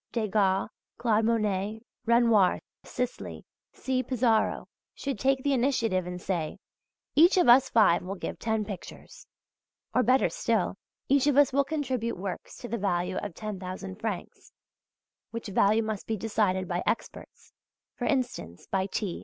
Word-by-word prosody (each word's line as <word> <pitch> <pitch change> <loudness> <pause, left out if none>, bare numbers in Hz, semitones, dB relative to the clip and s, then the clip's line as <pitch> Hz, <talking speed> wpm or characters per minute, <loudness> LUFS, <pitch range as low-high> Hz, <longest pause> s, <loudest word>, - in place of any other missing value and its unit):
Degas, 205 -4 +1 0.3
Claude 225 -2 +2
Monet, 215 -1 0 0.3
Renoir, 230 -5 +4 0.2
Sisley, 250 -1 -5 0.3
C. 260 -1 -1
Pissaro 240 -3 +1 0.3
should 275 -6 -4
take 265 +2 +1
the 285 - +2
initiative 235 -8 +1
and 180 0 -5
say: 170 -4 -3 0.6
Each 345 +6 +6
of 360 - +4
us 260 +2 +7
five 210 -7 +4
will 190 +2 -5
give - - -6
ten 220 -2 -1
pictures 195 -4 -10 0.7
(or 250 - +4
better 255 +3 +4
still, 220 -6 0 0.3
each 280 +1 +3
of 285 -2 +3
us 285 -2 +5
will 280 +1 +4
contribute 260 -7 -2
works 185 0 -6
to 240 - -7
the 235 -1 -3
value 180 -1 -1
of 205 -5 -5
10,000 190 -2 -6
francs, 215 -5 -5 0.8
which 230 -2 -6
value 210 +3 +3
must 215 -2 -4
be 220 - -1
decided 200 -3 0
by 175 0 -1
experts - - -4 0.4
for - - -4
instance, 240 - -2
by 190 0 -1
T. 200 -2 -3
220 Hz, 145 wpm, -28 LUFS, 190-250 Hz, 0.8 s, us